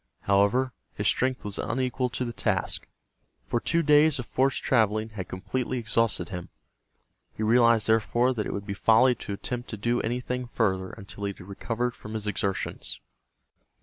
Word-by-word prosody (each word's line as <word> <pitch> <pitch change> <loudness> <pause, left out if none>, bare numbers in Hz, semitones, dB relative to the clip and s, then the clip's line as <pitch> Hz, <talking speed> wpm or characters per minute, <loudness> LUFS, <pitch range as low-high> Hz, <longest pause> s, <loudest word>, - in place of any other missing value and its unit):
However, 100 +6 +2 0.2
his - - -3
strength 130 -2 +1
was 100 -1 -4
unequal 125 0 -1
to 125 +1 -3
the 120 - -4
task, - - 0 0.6
for 120 - 0
two 170 +7 +1
days 150 0 +5
of 125 - -4
forced 135 +3 +1
traveling 110 -2 +2
had 100 -5 -6
completely 120 +7 -3
exhausted 115 -2 +1
him. 90 -3 -6 0.8
He 110 - -4
realized, 115 -1 +5
therefore, 120 +3 +2
that 110 -4 -2
it - - -3
would 100 0 -4
be 100 - -3
folly 115 +5 +5
to 105 - -6
attempt 120 +4 -5
to 110 - -5
do 120 +4 0
anything 125 +2 -2
further 95 -6 0
until 100 -1 -8
he 100 - -2
had - - -15
recovered 115 +4 -2
from 110 +1 -8
his 110 -1 -3
exertions. 100 -2 -1
115 Hz, 170 wpm, -27 LUFS, 105-125 Hz, 0.8 s, days